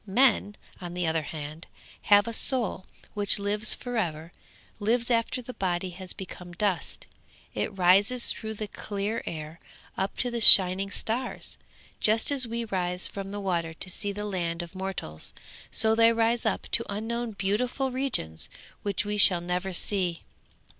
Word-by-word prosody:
Men, 210 Hz, -1 st, +3 dB, 0.3 s
on 175 Hz, -1 st, -7 dB
the 180 Hz, -1 st, -1 dB
other 160 Hz, 0 st, 0 dB
hand, 155 Hz, +1 st, -8 dB, 0.4 s
have 205 Hz, +1 st, +6 dB
a 230 Hz, -, -4 dB
soul 230 Hz, -6 st, -1 dB, 0.3 s
which 205 Hz, 0 st, +3 dB
lives 205 Hz, +1 st, +3 dB
for 245 Hz, -1 st, -5 dB
ever, 165 Hz, -4 st, -3 dB, 0.5 s
lives 235 Hz, +3 st, +1 dB
after 235 Hz, +2 st, 0 dB
the 250 Hz, -, -8 dB
body 185 Hz, -2 st, -2 dB
has 185 Hz, +1 st, -5 dB
become 180 Hz, -2 st, -9 dB
dust; 190 Hz, -1 st, -2 dB, 0.5 s
it 200 Hz, -, -3 dB
rises 200 Hz, +7 st, +4 dB
through 220 Hz, -1 st, -5 dB
the 215 Hz, 0 st, -5 dB
clear 205 Hz, +2 st, -4 dB
air, 155 Hz, 0 st, -6 dB, 0.4 s
up 190 Hz, +1 st, -3 dB
to 245 Hz, -, -1 dB
the 235 Hz, -1 st, -3 dB
shining 190 Hz, -1 st, +9 dB
stars! 230 Hz, +5 st, -4 dB, 0.4 s
Just 220 Hz, +5 st, +2 dB
as 265 Hz, -4 st, +3 dB
we 230 Hz, +1 st, -3 dB
rise 180 Hz, -3 st, 0 dB
from 195 Hz, -1 st, -7 dB
the 205 Hz, +1 st, -5 dB
water 170 Hz, -4 st, -2 dB
to 185 Hz, -, -3 dB
see 205 Hz, +3 st, -3 dB
the 210 Hz, +1 st, -5 dB
land 175 Hz, -4 st, -3 dB
of 170 Hz, -, -11 dB
mortals, 185 Hz, -, -4 dB, 0.4 s
so 220 Hz, 0 st, +2 dB
they 230 Hz, +1 st, +5 dB
rise 230 Hz, +1 st, +1 dB
up -, -, -1 dB
to 230 Hz, -, +3 dB
unknown 225 Hz, +2 st, -3 dB
beautiful 240 Hz, +7 st, -1 dB
regions 250 Hz, -, -2 dB, 0.3 s
which 200 Hz, 0 st, -2 dB
we 210 Hz, 0 st, -2 dB
shall 190 Hz, -3 st, +7 dB
never 180 Hz, +2 st, -3 dB
see.' 180 Hz, -2 st, -1 dB
200 Hz, 160 wpm, -27 LUFS, 180-225 Hz, 0.5 s, shining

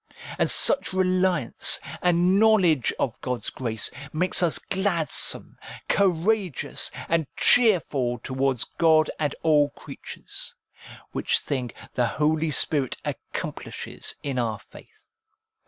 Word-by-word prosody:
And -, -, +2 dB
such 275 Hz, -, +5 dB
reliance, 185 Hz, -6 st, +2 dB, 0.2 s
and 180 Hz, +2 st, +3 dB
knowledge 190 Hz, -, +3 dB
of 120 Hz, -, -3 dB
God's 125 Hz, -4 st, -4 dB
grace, 115 Hz, -4 st, -2 dB, 0.2 s
makes 180 Hz, +3 st, +2 dB
us 170 Hz, -3 st, +3 dB
glad 190 Hz, -5 st, -2 dB
some, -, -, -1 dB, 0.3 s
courageous, 190 Hz, -, 0 dB, 0.2 s
and 165 Hz, -3 st, 0 dB
cheerful 150 Hz, -, +3 dB
towards 130 Hz, +1 st, -1 dB
God 160 Hz, -2 st, +2 dB
and 150 Hz, -2 st, -1 dB
all 150 Hz, -3 st, +3 dB
creatures; -, -, -7 dB, 0.6 s
which -, -, 0 dB
thing 130 Hz, -4 st, -2 dB, 0.2 s
the 120 Hz, -1 st, +1 dB
Holy 155 Hz, +4 st, 0 dB
Spirit 145 Hz, -3 st, +1 dB
accomplishes -, -, -5 dB
in 135 Hz, -3 st, -2 dB
our 115 Hz, -3 st, -1 dB
faith. -, -, -17 dB
160 Hz, 110 wpm, -24 LUFS, 130-185 Hz, 0.6 s, such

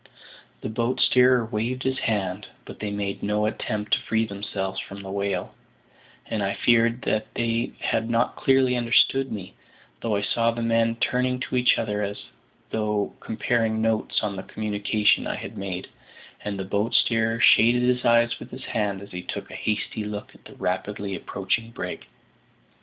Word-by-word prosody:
The -, -, -3 dB
boat 115 Hz, +3 st, -1 dB
steerer 125 Hz, -1 st, +5 dB
waved 115 Hz, +3 st, -2 dB
his 130 Hz, 0 st, 0 dB
hand, 100 Hz, -2 st, -1 dB, 0.2 s
but -, -, -10 dB
they 105 Hz, -, -3 dB
made 100 Hz, -1 st, -3 dB
no 105 Hz, +1 st, +1 dB
attempt 105 Hz, -1 st, -2 dB
to -, -, +5 dB
free 110 Hz, 0 st, +1 dB
themselves 100 Hz, -2 st, -4 dB
from 100 Hz, 0 st, -8 dB
the 95 Hz, -, -6 dB
whale, 100 Hz, 0 st, -2 dB, 0.7 s
and 110 Hz, -, -2 dB
I 100 Hz, 0 st, 0 dB
feared 115 Hz, 0 st, +3 dB, 0.3 s
they 115 Hz, 0 st, 0 dB
had 115 Hz, +1 st, 0 dB
not 120 Hz, +1 st, +1 dB
clearly 130 Hz, -1 st, +3 dB
understood 125 Hz, +3 st, +3 dB
me; 95 Hz, -4 st, -6 dB, 0.5 s
though 115 Hz, -3 st, 0 dB
I 100 Hz, -, 0 dB
saw 115 Hz, +2 st, +2 dB
the 115 Hz, 0 st, -2 dB
men 115 Hz, 0 st, +2 dB
turning 125 Hz, +2 st, 0 dB
to 125 Hz, -, -3 dB
each 125 Hz, 0 st, +4 dB
other 105 Hz, -2 st, -1 dB
as 100 Hz, 0 st, -2 dB, 0.5 s
though 105 Hz, -2 st, 0 dB
comparing 110 Hz, -1 st, 0 dB
notes 110 Hz, 0 st, 0 dB
on 105 Hz, -2 st, -1 dB
the 95 Hz, -, -4 dB
communication 105 Hz, 0 st, +1 dB
I -, -, -2 dB
had -, -, -7 dB
made, 95 Hz, -2 st, -4 dB, 0.6 s
and 105 Hz, -1 st, -3 dB
the 95 Hz, -, -3 dB
boat 100 Hz, +4 st, 0 dB
steerer 115 Hz, 0 st, +2 dB
shaded 120 Hz, +1 st, +6 dB
his 125 Hz, 0 st, +2 dB
eyes 115 Hz, 0 st, +4 dB
with -, -, -9 dB
his -, -, -9 dB
hand 100 Hz, -3 st, -1 dB
as 100 Hz, -, -12 dB
he 90 Hz, -, -5 dB
took -, -, -6 dB
a -, -, -8 dB
hasty 110 Hz, 0 st, -2 dB
look 105 Hz, 0 st, -6 dB
at -, -, -21 dB
the -, -, -12 dB
rapidly 100 Hz, +2 st, -2 dB
approaching 100 Hz, +5 st, -2 dB
brig. 115 Hz, -, -6 dB
110 Hz, 175 wpm, -25 LUFS, 100-115 Hz, 0.7 s, shaded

